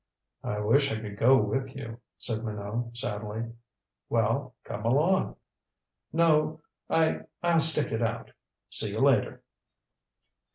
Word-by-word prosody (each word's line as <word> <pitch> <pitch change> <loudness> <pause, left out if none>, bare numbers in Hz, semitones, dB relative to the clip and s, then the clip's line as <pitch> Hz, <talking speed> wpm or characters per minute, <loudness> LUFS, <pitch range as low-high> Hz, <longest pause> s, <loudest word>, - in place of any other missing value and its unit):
"I 105 - -2
wish 135 +7 +3
I 110 - -2
could 105 -2 -7
go 130 +5 +5
with 135 0 -2
you," 115 -3 -7 0.2
said 110 -2 -1
Minot 110 +2 -4
sadly. 110 +1 -4 0.6
"Well - - 0
come 105 - -6
along 150 +11 +2 0.4
" - - -58 0.2
"No. 155 0 +2 0.3
I 160 -1 +2 0.2
I'll 170 -1 +4
stick 160 -1 +5
it 115 +1 -1
out. 115 0 -2 0.4
See - - 0
you - - -3
later." - - +2
115 Hz, 130 wpm, -28 LUFS, 110-145 Hz, 0.6 s, go